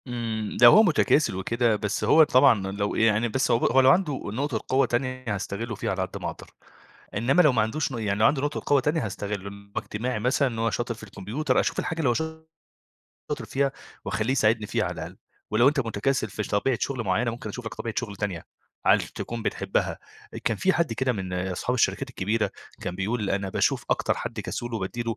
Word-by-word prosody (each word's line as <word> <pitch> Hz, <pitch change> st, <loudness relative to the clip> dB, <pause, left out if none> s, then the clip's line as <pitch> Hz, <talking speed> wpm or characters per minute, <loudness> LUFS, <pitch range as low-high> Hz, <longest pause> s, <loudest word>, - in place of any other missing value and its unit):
إمم، 115 Hz, -3 st, -3 dB
لو 120 Hz, 0 st, +10 dB
هو 220 Hz, -, +8 dB
متكاسل 155 Hz, -, +3 dB
وكده 115 Hz, +4 st, +1 dB
بس 105 Hz, 0 st, -2 dB
هو 160 Hz, -, +7 dB
طبعًا 125 Hz, -9 st, +4 dB
لو 100 Hz, +1 st, -2 dB
يعني 110 Hz, +1 st, +3 dB
بس 125 Hz, +3 st, 0 dB
هو 115 Hz, -, +4 dB
ب -, -, -5 dB
هو 135 Hz, -, +5 dB
لو 130 Hz, -, +6 dB
عنده 150 Hz, -5 st, +1 dB
نقطة 120 Hz, +2 st, -2 dB
قوة 135 Hz, +1 st, +3 dB
تانية 130 Hz, +1 st, -2 dB
هاستغله 100 Hz, +4 st, -4 dB
فيها 100 Hz, -, -2 dB
على 95 Hz, -1 st, -2 dB
قد 95 Hz, 0 st, -4 dB
ما -, -, -2 dB
اقدر، -, -, -11 dB, 0.6 s
إنمّا 125 Hz, -, +3 dB
لو 150 Hz, -5 st, +5 dB
ما 115 Hz, -4 st, +2 dB
عندوش 125 Hz, +8 st, -1 dB
ن 120 Hz, -, -4 dB
يعني 105 Hz, -2 st, -1 dB
لو 110 Hz, -, +5 dB
عنده 140 Hz, -2 st, +3 dB
نقطة 145 Hz, +1 st, -2 dB
قوة 145 Hz, -, +4 dB
تانية 150 Hz, 0 st, 0 dB
هاستغله، 100 Hz, -1 st, -4 dB
إن 100 Hz, 0 st, -13 dB
هو -, -, +1 dB
اجتماعي 120 Hz, +2 st, -3 dB
مثلًا، 125 Hz, +5 st, +2 dB
إن 115 Hz, -3 st, -4 dB
هو 115 Hz, 0 st, +2 dB
شاطر 120 Hz, +1 st, -2 dB
في 110 Hz, -, -13 dB
الكمبيوتر، 110 Hz, +8 st, -1 dB
أشوف -, -, 0 dB
الحاجة 165 Hz, -, -3 dB
اللي 145 Hz, -6 st, +2 dB
هو -, -, +3 dB
ش 160 Hz, -, 0 dB, 1.1 s
شاطر -, -, -3 dB
فيها 140 Hz, 0 st, 0 dB, 0.3 s
واخلّيه 110 Hz, +4 st, -1 dB
يساعدني 110 Hz, -4 st, +2 dB
فيها -, -, 0 dB
على -, -, -2 dB
الأقل، -, -, -7 dB, 0.3 s
ولو 120 Hz, +5 st, +5 dB
أنت 145 Hz, -1 st, +1 dB
متكاسل 115 Hz, 0 st, -1 dB
في 105 Hz, -, -3 dB
ش -, -, -6 dB
طبيعة 115 Hz, +4 st, +1 dB
شغل 130 Hz, -4 st, -2 dB
معيّنة 110 Hz, +5 st, +1 dB
ممكن 120 Hz, +3 st, -7 dB
اشوف 125 Hz, -2 st, -7 dB
لك -, -, -5 dB
طبيعة 115 Hz, -2 st, -5 dB
شغل 100 Hz, -1 st, -5 dB
تانية 95 Hz, -5 st, -4 dB, 0.4 s
علش -, -, +4 dB
تكون 120 Hz, -1 st, -5 dB
بتحبها -, -, -1 dB, 0.4 s
آآ، -, -, -4 dB
كان 115 Hz, -, +1 dB
في 190 Hz, -, +2 dB
حد 165 Hz, -8 st, 0 dB
كده 130 Hz, +2 st, 0 dB
من 95 Hz, -4 st, -5 dB
اصحاب 90 Hz, +6 st, -2 dB
الشركات 130 Hz, +2 st, +1 dB
الكبيرة 110 Hz, 0 st, -1 dB, 0.3 s
كان 90 Hz, -, -4 dB
بيقول 105 Hz, +2 st, -1 dB
أنا 95 Hz, 0 st, -1 dB
باشوف -, -, +1 dB
أكتر -, -, +1 dB
حد -, -, -4 dB
كسول 120 Hz, -1 st, -5 dB
وبادّي 110 Hz, +3 st, -3 dB
له 115 Hz, -1 st, -3 dB
115 Hz, 220 wpm, -26 LUFS, 105-130 Hz, 1.1 s, لو